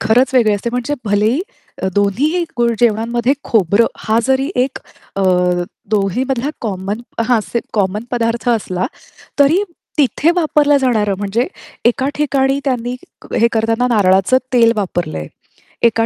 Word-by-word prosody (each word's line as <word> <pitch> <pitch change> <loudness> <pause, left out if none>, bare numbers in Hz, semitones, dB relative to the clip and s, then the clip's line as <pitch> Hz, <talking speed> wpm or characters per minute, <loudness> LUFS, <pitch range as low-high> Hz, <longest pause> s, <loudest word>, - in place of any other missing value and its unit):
खरंच 245 +4 +2
वेगळी 230 -4 +4
असते. 205 +4 -3
म्हणजे 250 +4 -2
भलेही 210 +6 +1 0.4
अ, - - +1
दोन्हीही 265 - +1 0.2
गुळ 235 0 +3
जेवणांमध्ये 235 +2 +2
खोबरं, 210 +1 +3
हा 220 +1 +1
जरी 265 +3 +1
एक 270 - -6 0.4
अ, 195 - 0 0.7
दोन्हीमधला 245 +7 0
कॉमन 200 0 -3 0.3
हां, 240 -3 +4
से 235 - +1
कॉमन 205 +1 0
पदार्थ 235 -1 -1
असला, 190 -6 0 0.5
तरी 300 +8 +4 0.4
तिथे 295 +3 +3
वापरलं 300 -3 +3
जाणारं, 215 -6 +1
म्हणजे 205 +5 -1 0.4
एका 260 +3 0
ठिकाणी 275 -2 +1
त्यांनी 250 -3 -1 0.4
हे 235 - +4
करतांना 225 +2 +1
नारळाचं 195 +4 +4
तेल 230 -2 +5
वापरलंय. 175 - -3 0.6
एका 225 -1 +3
235 Hz, 130 wpm, -17 LUFS, 210-260 Hz, 0.7 s, तेल